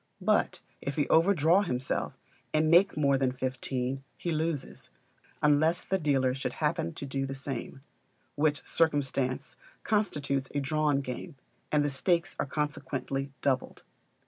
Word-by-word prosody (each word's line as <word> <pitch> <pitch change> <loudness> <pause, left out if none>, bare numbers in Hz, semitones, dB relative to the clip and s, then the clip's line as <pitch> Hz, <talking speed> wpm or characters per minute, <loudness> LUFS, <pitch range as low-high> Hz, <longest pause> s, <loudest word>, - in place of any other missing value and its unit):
But - - +1 0.2
if 140 - -3
he 145 - +1
overdraw 170 +1 +5
himself, 130 -9 -2 0.4
and 155 +1 +3
make 180 +2 +5
more 140 -2 +3
than 130 -1 +2
fifteen, 130 +1 -3
he 175 - -3
loses, 155 -2 -3 0.5
unless 155 +4 +4
the 190 - 0
dealer 135 -5 +2
should 135 - -3
happen 85 - -1
to - - -5
do 135 0 -2
the 135 - -5
same; 135 -1 -5 0.5
which 150 -1 +1
circumstance 140 -3 0 0.3
constitutes 145 -11 0
a - - +2
drawn 145 0 +1
game; 135 +5 -6 0.4
and 150 -1 +3
the - - +1
stakes 170 +6 +1
are - - 0
consequently 140 -2 -3
doubled. 130 -2 -1
145 Hz, 140 wpm, -29 LUFS, 135-155 Hz, 0.5 s, overdraw